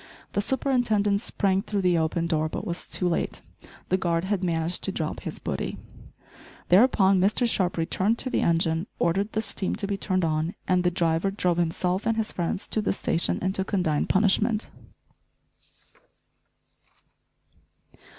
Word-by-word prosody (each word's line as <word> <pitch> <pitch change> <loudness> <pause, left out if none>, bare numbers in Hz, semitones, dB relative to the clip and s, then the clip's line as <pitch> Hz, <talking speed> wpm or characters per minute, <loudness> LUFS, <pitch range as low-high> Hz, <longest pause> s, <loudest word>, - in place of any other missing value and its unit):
The 205 - +1
superintendent 220 -5 +1
sprang 195 -4 +1
through 205 -2 -2
the 175 -2 +3
open 160 +1 0
door, 155 -2 0
but 195 - -5
was 175 -3 -4
too 180 - -1
late. 170 - -2 0.5
The 185 - +3
guard 170 -2 0
had 195 -1 -1
managed 165 0 0
to 195 - 0
drop 160 -4 -3
his - - -6
booty. - - -4 0.9
Thereupon 195 -1 +5
Mr 210 +6 +2
Sharp 185 -6 0
returned 190 +7 +1
to 255 - -2
the - - +1
engine, 165 +2 +1
ordered 195 +5 0
the 220 - 0
steam 195 -3 -2
to 205 - -2
be 200 0 -2
turned 185 -3 0
on, 160 +2 -1
and 180 -1 +2
the 180 - +3
driver 170 +1 +1
drove 180 -3 0
himself 180 +3 0
and 225 0 +1
his 220 -1 -1
friends 180 +3 -3
to 215 - 0
the - - 0
station 170 -3 0
and 190 +1 0
to 190 - -1
condign 180 -7 0
punishment. 210 +3 +2
185 Hz, 160 wpm, -26 LUFS, 170-205 Hz, 0.9 s, Thereupon